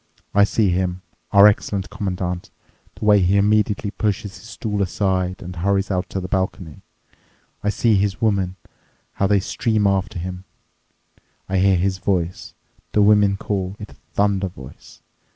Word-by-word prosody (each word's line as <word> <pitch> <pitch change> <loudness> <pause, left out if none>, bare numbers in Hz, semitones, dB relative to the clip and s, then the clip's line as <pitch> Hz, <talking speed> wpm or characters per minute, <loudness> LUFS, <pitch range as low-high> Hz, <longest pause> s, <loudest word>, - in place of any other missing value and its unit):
I 100 0 +5
see 105 -1 +1
him, 90 0 -1 0.3
our 100 0 +8
excellent 100 -3 +2
Commandant—the 90 +1 -6
way 105 -1 +6
he 95 +2 +3
immediately 105 0 +2
pushes 105 -2 -2
his 110 - -13
stool 105 -2 -3
aside 95 -1 -1
and 90 0 -8
hurries 100 +3 0
out 90 -1 -1
to 95 - -3
the 90 - -5
balcony—I 95 +2 -6
see 110 +2 +2
his 100 -1 +1
women, 100 -5 0 0.6
how 100 - 0
they 100 0 +3
stream 110 +2 0
after 95 -1 0
him. 90 +1 -5 1.0
I 95 0 0
hear 95 0 +4
his 95 +1 0
voice—the 95 +3 -3
women 100 -1 +4
call 95 -2 -3
it 105 - -9
a - - -16 0.2
thunder 100 -1 +1
voice. 65 -7 -13
95 Hz, 145 wpm, -21 LUFS, 90-105 Hz, 1.0 s, our